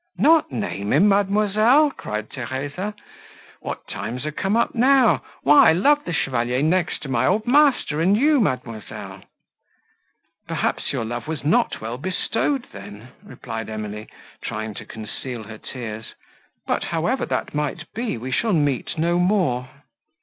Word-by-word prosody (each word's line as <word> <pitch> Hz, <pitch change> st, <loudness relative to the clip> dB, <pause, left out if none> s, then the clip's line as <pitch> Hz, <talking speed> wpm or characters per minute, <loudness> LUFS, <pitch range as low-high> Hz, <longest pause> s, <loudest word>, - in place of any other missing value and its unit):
"Not 320 Hz, 0 st, +4 dB
name 105 Hz, -, -2 dB
him, 185 Hz, +9 st, +5 dB
mademoiselle!" 215 Hz, +8 st, +4 dB
cried 105 Hz, -, -5 dB
Theresa: 145 Hz, -, -4 dB, 0.6 s
"what -, -, -6 dB
times 125 Hz, +5 st, -5 dB
are 155 Hz, -, -2 dB
come 195 Hz, +7 st, 0 dB
up 235 Hz, -, +1 dB
now? 255 Hz, -1 st, +4 dB, 0.2 s
Why, 145 Hz, +2 st, +7 dB
I -, -, +5 dB
love 290 Hz, -, +3 dB
the 175 Hz, -, -3 dB
Chevalier 125 Hz, -4 st, 0 dB
next 170 Hz, +2 st, +1 dB
to -, -, -6 dB
my 130 Hz, -1 st, +1 dB
old 210 Hz, +4 st, +1 dB
master 250 Hz, -, +3 dB
and 190 Hz, +5 st, +4 dB
you, 295 Hz, +3 st, +4 dB
mademoiselle." 115 Hz, -, -4 dB, 1.3 s
"Perhaps -, -, -1 dB
your 115 Hz, -, -2 dB
love 120 Hz, +4 st, -5 dB
was 160 Hz, -2 st, -4 dB
not 235 Hz, +10 st, +2 dB
well 115 Hz, +3 st, -5 dB
bestowed, 225 Hz, -, -1 dB
then," 105 Hz, +4 st, -11 dB
replied 115 Hz, -, -7 dB
Emily, 105 Hz, 0 st, -6 dB, 0.4 s
trying 110 Hz, 0 st, -4 dB
to -, -, -9 dB
conceal 110 Hz, +2 st, -6 dB
her 110 Hz, +1 st, -10 dB
tears; 110 Hz, -3 st, -7 dB, 0.5 s
"but, -, -, -1 dB
however -, -, -1 dB
that -, -, -2 dB
might 150 Hz, +2 st, -2 dB
be, 230 Hz, -, -2 dB
we 125 Hz, +3 st, -6 dB
shall 220 Hz, -, +1 dB
meet 145 Hz, -2 st, 0 dB
no 170 Hz, +2 st, +1 dB
more." 175 Hz, -10 st, +1 dB
150 Hz, 150 wpm, -22 LUFS, -, 1.3 s, Why